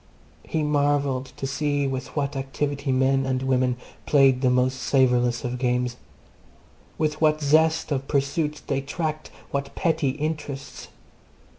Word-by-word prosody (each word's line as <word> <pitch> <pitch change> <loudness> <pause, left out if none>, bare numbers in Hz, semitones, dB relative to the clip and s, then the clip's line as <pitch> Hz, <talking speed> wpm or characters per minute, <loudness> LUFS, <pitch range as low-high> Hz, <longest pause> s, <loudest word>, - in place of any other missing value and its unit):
He 160 -1 -2
marvelled 145 -3 +1
to - - -4
see 145 +1 0
with 130 -1 -4
what 140 -1 -1
activity 140 +1 -2
men 135 +1 +2
and 130 -1 -1
women 130 -1 +1 0.3
played 135 -3 +5
the 130 - +3
most 125 +1 +2
savourless 125 -3 +2
of 125 0 -3
games! 125 -1 0 1.0
With 155 0 -1
what 155 -1 +4
zest 160 +2 +3
of 135 -1 -1
pursuit 150 +2 -1
they 135 - -1
tracked 155 +2 -4 0.2
what 140 0 -3
petty 160 -4 +1
interests. 150 -1 -4
140 Hz, 135 wpm, -24 LUFS, 130-150 Hz, 1.0 s, played